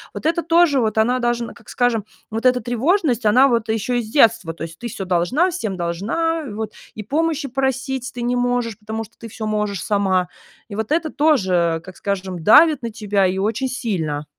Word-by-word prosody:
Вот - - -7
это 335 +2 +2
тоже, 335 -4 +3
вот 220 -2 0
она, 245 +3 +2
должна, 240 -1 -1
как 225 - -18
скажем, 245 -3 +1 0.3
вот 225 +3 +1
эта 250 -1 +2
тревожность, 245 - +1
она 255 +6 +6
вот 230 -3 0
еще 225 +3 0
и - - 0
с 215 - -9
детства. 225 - +3
То - - -7
есть: 165 0 -8
"Ты 240 - -5
всё 195 -3 -6
должна, 190 - +1
всем 220 - -4
должна, 235 - -1
и - - -7
вот, 215 0 -4 0.2
и 215 - -6
помощи 305 +3 -1
просить 265 0 -2
ты 245 - -6
не 245 +1 0
можешь, 245 -3 -1
потому 220 +1 -5
что 220 - -17
ты 230 - -8
всё 220 0 -6
можешь 210 -3 -1
сама." 190 -3 +1 0.4
И 200 - -6
вот 220 +3 -4
это 320 0 +1
тоже, 185 - +2
как 185 0 -12
скажем, 190 -2 -3
давит 300 - +6
на 235 - -2
тебя 205 -3 0
и 185 +1 -2
очень 220 +6 -1
сильно. 180 - -3
230 Hz, 210 wpm, -20 LUFS, 200-265 Hz, 0.4 s, она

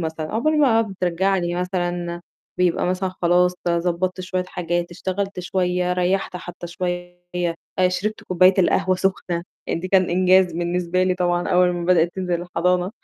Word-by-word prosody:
مثلًا 160 -1 -4
عقبال 305 +8 +1
ما 230 -6 +4
بترجع 190 -2 0
لي 175 -1 -1
مثلًا 175 -1 -2 0.4
بيبقى 180 -1 +2
مثلًا 185 +1 -1
خلاص 180 +1 +3
ضبّطت 175 +2 0
شوية 185 0 -2
حاجات، 175 -1 -2
اشتغلت 190 +2 -3
شوية، 180 -1 0
ريّحت 180 +1 0
حتى 175 0 -8
شوية، 175 0 -4 0.7
شربت 210 +4 -3
كوباية 185 +1 +4
القهوة 185 0 +2
سُخنة، 185 -2 -1 0.2
يعني - - -2
دي 185 - -5
كان 185 -1 +3
إنجاز 185 0 +4
بالنسبة 175 +1 -1
لي 185 0 +2
طبعًا 175 -1 0
أول 180 0 +4
ما 175 -1 -3
بدأِت 175 -1 +3
تنزل 180 -2 -2
الحضانة. 180 +1 0
180 Hz, 150 wpm, -22 LUFS, 175-185 Hz, 0.7 s, ما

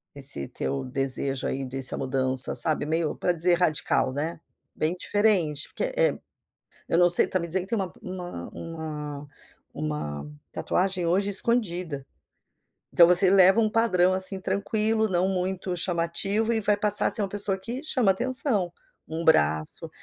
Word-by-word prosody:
Esse 135 - 0
teu 135 -1 -5
desejo 135 +1 +2
aí 135 0 -5
dessa 130 0 -1
mudança 130 -1 +5
sabe, 155 -2 +6
meio 160 0 -3
para 180 - -2
dizer 175 +1 +3
radical 155 -6 -1
né, 155 +3 -5 0.4
bem 160 +3 -3
diferente 180 -9 -1
porque - - -6
é - - 0 0.7
eu 165 - 0
não 175 0 +3
sei, 175 - +10
está 185 - -3
me 170 - -6
dizendo 180 +2 +1
que 190 - -15
tem 230 - -2
uma 190 -2 -5 0.6
uma 150 -3 -9 0.5
uma 75 -1 -6 0.2
tatuagem 185 -1 -3
hoje 195 +4 -1
escondida. 180 - -2 0.9
Então 170 - +5
você 180 +2 +4
leva 195 +3 +4
uma 215 - -1
padrão 185 -6 +1
assim 190 0 -3
tranquilo, 215 +3 -2
não 185 -1 -1
muito 185 -1 -4
chamativo 185 +6 -2
e 225 - -1
vai 210 -1 0
passar 210 0 +3
a - - -1
ser - - 0
uma 200 - -3
pessoa 200 -1 -2
que 235 +7 -8
chama 250 -10 0
atenção, 240 -3 +2 0.3
um 160 +1 -6
braço, 80 - -1
180 Hz, 155 wpm, -24 LUFS, 150-200 Hz, 0.9 s, sei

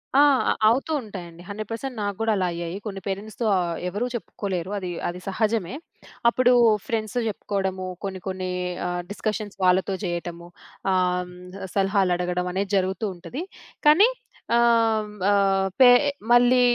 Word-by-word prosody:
ఆ! - - +6 0.3
అ - - +4 0.2
అవుతూ 265 +8 +2
ఉంటాయండి. 175 -6 -9
100% 210 +1 -6
పర్సెంట్ 250 +3 -4
నా 205 - -1
గూడా 225 0 +1
అలా 185 - +1
అయ్యాయి. 170 +1 -4
కొన్ని 195 -2 -5
పేరెంట్స్‌తో 205 +3 -4
ఆహ్, 170 -2 -1
ఎవరు 205 +7 -2
చెప్పుకోలేరు. 195 -5 -4
అది, 185 -2 -4 0.2
అది 175 +1 -4
సహజమే. 215 +1 -1 0.5
అప్పుడు 250 +1 +3 0.4
ఫ్రెండ్స్‌తో 225 +1 -1
చెప్పుకోవడము, 190 -2 -3 0.2
కొన్ని 190 -1 -4
కొన్ని 185 -1 -3 0.4
ఆహ్, 175 0 -2
డిస్కషన్స్ 210 -1 -3
వాళ్ళతో 185 +2 +3
జేయటము, 175 -1 -4 0.4
ఆహ్, 185 -1 +3 0.3
హ్మ్. 180 +2 -9
సలహాలడగడం 180 -2 +1
అనేది 195 +2 -2
జరుగుతూ 190 +2 -1
ఉంటది. 250 - -7 0.5
కానీ 345 +9 +7 0.5
ఆహ్, 225 -2 +3 0.2
ఆహ్, 195 -1 +3
పె 255 - +9 0.4
మళ్ళీ 245 +1 +5
195 Hz, 135 wpm, -24 LUFS, 180-220 Hz, 0.5 s, పె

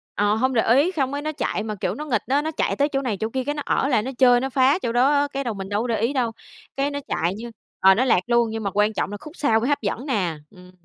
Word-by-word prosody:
Ờ, 205 +1 +2
hông 260 +3 +1
để 225 - +3
ý, 300 +7 +3
xong 270 -6 -1
cái 285 - -3
nó 310 +1 -3
chạy 255 -7 -2
mà, 215 -1 -4
kiểu, 195 - -3
nó 300 - -6
nghịch 235 -8 0
á, 280 +3 +2
nó 315 +1 -3
chạy - - -1
tới 285 +1 +1
chỗ 275 -1 -1
này 225 -7 -2
chỗ 220 - -2
kia, 260 +2 -2
cái 290 +3 -3
nó 290 - -4
ở 275 - +1
lại 240 -6 +2
nó 265 - -4
chơi, 245 -2 +5
nó 265 +1 -2
phá 265 +5 +3
chỗ 235 - -2
đó 250 +4 +3
á, 285 0 +2
cái 275 - -2
đầu 235 -4 -2
mình 195 0 -7
đâu 205 +2 0
có 245 - -3
để 225 -3 -1
ý 235 +6 0
đâu. 240 -4 0 0.5
Cái 280 +1 0
nó 285 - -3
chạy 175 +2 -1
như 235 +2 -8 0.3
ờ, 190 0 +6
nó 255 +4 +1
lạc 225 - +4
luôn, 235 -1 +2
nhưng 220 -1 -4
mà 200 - -1
quan 210 +1 +2
trọng 205 - -2
là 205 - -5
khúc 305 +5 -11
sau 225 -7 +2
mới 245 +5 -1
hấp 290 - +1
dẫn 225 +6 -3
nè. 185 - -1
Ừm. 180 -1 -16
245 Hz, 325 wpm, -23 LUFS, 215-280 Hz, 0.5 s, ờ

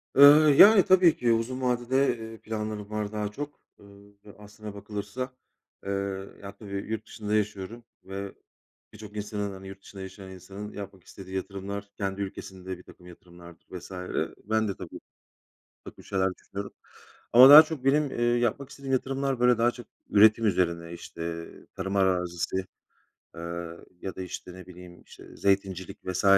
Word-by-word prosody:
Iıı, 145 +2 +9
yani, 205 +2 +9
tabii 185 -3 +6
ki 120 -1 +2
uzun 120 +3 -1
vadede, 125 +1 +1
eee, 110 0 -8
planlarım 105 -1 -5
var 105 -1 -3
daha 105 -1 -3
çok, 145 +5 -7 0.2
ııı, 100 0 -17 0.2
aslına 105 0 -10
bakılırsa. 105 +5 -5 0.5
Eee, 100 - -2 0.5
ya, 100 0 -9
tabii 100 -3 -10 0.2
yurt 110 -1 -3
dışında 105 -1 -3
yaşıyorum 105 +2 -2 0.2
ve 100 +1 -7 0.6
birçok 105 0 -11
insanın, 105 -1 -3
hani, 95 0 -10
yurt 95 0 -10
dışında 95 -1 -11
yaşayan 95 0 -9
insanın, 100 +3 -9
yapmak 100 -3 -9
istediği 95 -1 -10
yatırımlar, 100 +2 -5
kendi 100 0 -3
ülkesinde 95 -1 -6
birtakım 90 0 -16
yatırımlardır 85 -1 -15
vs. 90 +1 -9 0.5
Ben 110 0 +1
de 100 - -3
tabii, - - -9 0.9
birtakım - - -12
şeyler 95 -1 -1
düşünüyorum 100 0 -8 0.6
ama 130 +3 +10
daha 150 +2 +12
çok 155 -4 -7
benim, 145 0 +3
eee, 120 - -2 0.2
yapmak 120 +3 -1
istediğim 135 -1 -5
yatırımlar, 135 0 -1
böyle, 125 -1 +4
daha 120 +1 +3
çok 120 -3 -12 0.2
üretim 110 +2 +6
üzerine, 85 -3 0
işte, 85 -1 -6 0.3
tarım 95 +1 -3
arazisi, 90 -2 0 0.8
eee, 85 - -8 0.6
ya 95 - -5
da, 95 - -6
işte, 90 0 -7
ne 95 -1 -11
bileyim 90 -1 -13
işte - - -15
zeytincilik 95 -2 0
vs. 95 +1 -2
100 Hz, 150 wpm, -27 LUFS, 95-120 Hz, 0.9 s, daha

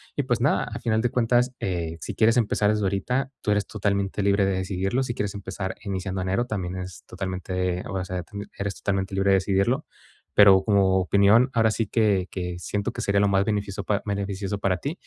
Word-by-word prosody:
y, 145 - +1
pues, 120 -2 0
nada, 140 - +2
a 115 - -6
final 110 -2 +1
de 120 - +1
cuentas, 125 +1 +2
eh, 85 -3 -3
si - - -5
quieres 115 +2 +4
empezar 105 -2 +2
desde 105 -1 +1
ahorita, 125 +8 -1
tú - - -4
eres 105 0 +1
totalmente 100 -1 -1
libre 100 0 +3
de 95 - +1
decidirlo, 95 +5 -1
si 120 -2 -4
quieres 105 -2 -2
empezar 95 -1 -5
iniciando 95 -1 -3
enero, 95 +6 0
también 95 -6 -4
es 90 -1 -7
totalmente 90 -1 -3
eh, - - -6
o 95 -3 -3
sea, 90 -1 -4
tien 100 +2 -8
eres 100 -1 -2
totalmente 95 -1 -2
libre 95 0 +2
de - - +6
decidirlo, 100 +9 +1 0.5
pero, 95 -2 +7
como 95 -2 +3
opinión, 100 +7 +4
ahora 110 -2 +3
sí 110 -1 -1
que 100 -5 +2
que 90 -1 -4
siento 100 +3 -3
que - - -5
sería 100 0 +1
lo 100 - +4
más 95 +1 +3
beneficioso 100 -2 -2
pa 100 -2 -1
beneficioso 100 0 -3
para 95 -2 +1
ti, 140 +11 -3
100 Hz, 210 wpm, -25 LUFS, 95-110 Hz, 0.5 s, pero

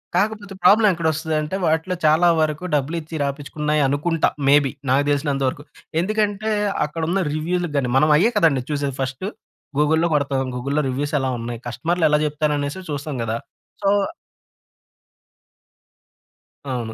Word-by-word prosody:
కాకపోతే 205 +1 0
ప్రాబ్లం 210 +4 +6
ఎక్కడొస్తదదంటే, 160 0 -1
వాటిలో 160 +3 +1
చాలా 160 +3 +5
వరకు 155 +1 0
డబ్బులిచ్చి 155 +3 -2
రాపిచ్చుకున్నాయి 150 +2 -1
అనుకుంటా, 155 +4 +1 0.2
మేబి, 145 -2 +5 0.2
నాకు 135 +2 +3
తెలిసినంత 140 -1 0
వరకు. 145 +3 -9 0.4
ఎందుకంటే, 215 +2 0 0.4
అక్కడున్న 165 +5 -1
రివ్యూలకు 170 +1 -2
గాని 125 -3 0
మనం 150 +3 +4
అయ్యే 215 +9 +3
కదండీ 150 -9 +3
చూసేది, 140 -2 -2
ఫస్టు 135 +7 -3 0.5
గూగుల్‌లో 160 +3 +3
కొడతాం, 140 -2 0
గూగుల్‌లో 140 +4 -1
రివ్యూసెలా 140 0 -1
ఉన్నాయి, 115 0 -5
కస్టమర్‌లెలా 150 +4 +1
చెప్తారనేసే 150 +2 -1
చూస్తాం 145 -1 -4
గదా! 115 0 -2 0.5
సో 195 - +3 2.8
అవును. 120 -3 -3
150 Hz, 115 wpm, -21 LUFS, 140-170 Hz, 2.8 s, ప్రాబ్లం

